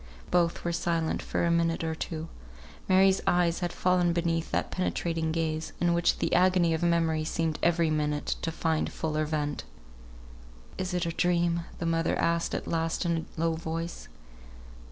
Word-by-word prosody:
Both 170 -1 +2
were 170 - -1
silent 165 -1 -1
for - - -1
a 170 - +2
minute 165 0 +1
or 160 0 -1
two. 160 0 -5 0.6
Mary's 190 +1 +5
eyes 175 -1 +2
had 175 -2 -2
fallen 180 -1 +2
beneath 165 -1 0
that - - -1
penetrating 165 -3 -1
gaze, 160 -1 -2
in 175 -1 +2
which 170 0 +2
the - - -1
agony 180 -2 +4
of 160 - -1
memory 165 -2 +2
seemed 160 0 -1
every 170 -1 +2
moment 150 -1 -1
to 165 - -2
find 160 -1 -1
fuller 155 -1 -1
vent. 150 -2 -2 1.2
"Is 185 -1 -2
it 180 -1 0
a 165 - -1
dream?" 170 0 +1
the 170 - -4
mother 165 0 +1
asked 170 0 0
at - - -4
last 165 +1 -1
in 165 -1 -1
a - - -6
low 165 0 +2
voice. 165 +1 -5
165 Hz, 170 wpm, -28 LUFS, 160-175 Hz, 1.2 s, Mary's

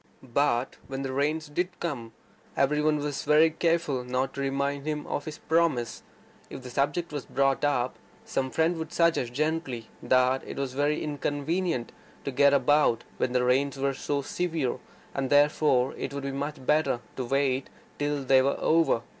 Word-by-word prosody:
But 130 -3 +1
when 135 0 -4
the 135 -1 -3
rains 150 +3 0
did 175 +4 -3
come, 120 -9 -4 0.4
every 150 +2 +2
one 150 0 +2 0.6
careful 165 -6 +1
not 125 +2 -1
to 140 - -4
remind 140 +1 -1
him 150 -1 -2
of 145 - -3
his 155 0 -6
promise. 160 -8 0 0.5
If 130 - -8
the 125 - -8
subject 145 +5 -1
was 145 -3 -5
brought 135 0 +1
up, 130 -4 0 0.3
some 130 -1 -1
friend 165 +4 +1
would 160 - -5
suggest 170 -8 +2
gently 140 -5 -2
that 130 +1 +3
it - - -8
was 135 -2 -2
very 145 +2 0
inconvenient 145 0 -2 0.3
to 140 - -2
get 140 +2 +5
about 140 -3 +3
when 125 - 0
the 125 -1 +2
rains 135 +3 +2
were 135 0 0
so 140 +1 -2
severe, 160 -6 -2 0.3
that 140 -1 +3
it 140 - -4
would 140 - -4
be 140 - -2
much 140 0 -4
better 150 -5 +2
to 130 - -3
wait 135 0 0 0.3
till 145 -1 -1
they 130 0 +5
were 140 +1 +1
over. 160 -7 +3
140 Hz, 165 wpm, -27 LUFS, 130-150 Hz, 0.6 s, get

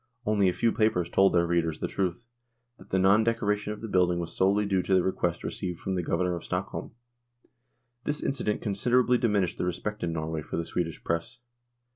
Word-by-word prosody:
Only 105 -3 +3
a - - -1
few 115 +4 +2
papers 110 -7 +1
told 95 0 +5
their 85 -1 +4
readers 85 -2 0
the - - -2
truth, 95 +3 -2 0.5
that - - -16
the 95 - +1
non 100 +4 +5
decoration 105 -2 0
of 105 - -7
the 115 - -5
building 90 -3 +2
was 85 -1 -4
solely 100 +2 +3
due 95 -2 +1
to 95 - +1
the 90 - +4
request 90 -2 -1
received 90 -2 -4
from 95 - -3
the 90 - 0
Governor 90 +2 0
of 85 - -7
Stockholm. - - -4 1.1
This 145 0 -2
incident 120 -6 -1
considerably 125 +4 +2
diminished 100 -7 +1
the - - 0
respect 90 +4 -3
in 85 - 0
Norway 80 -1 -3
for - - -5
the 85 - -2
Swedish 85 -2 -3
Press. 85 +7 -2
95 Hz, 200 wpm, -28 LUFS, 85-105 Hz, 1.1 s, told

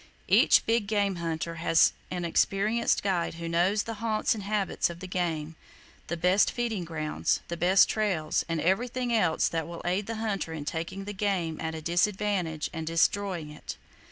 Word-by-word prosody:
Each - - +5
big 225 -2 +1
game 200 -3 +1
hunter 165 0 -3
has 165 -1 +4 0.2
an 180 -1 -3
experienced 205 +7 +1
guide 180 -5 0
who 170 0 -6
knows 180 +5 +2
the 225 - -5
haunts 225 +1 +1
and 220 - -6
habits 200 -2 0
of 170 0 -8
the 185 - -7
game, 165 -4 -2 0.5
the 170 - -3
best 180 +4 +3
feeding 230 -6 -2
grounds, 155 -2 -1
the 170 - -2
best 180 +3 +5
trails, 190 -8 0
and 165 -1 -1
everything 240 +8 0
else 180 -8 +2
that 165 -2 -2
will 170 0 -8
aid 185 +3 0
the 230 - -3
hunter 205 -7 -2
in 150 -2 -6
taking 170 +5 -4
the 205 - -5
game 190 -6 -1
at 160 0 -3
a 160 - -7
disadvantage 175 -2 0
and 160 -1 -5
destroying 170 -1 0
it. 150 - -8
180 Hz, 180 wpm, -28 LUFS, 165-205 Hz, 0.5 s, Each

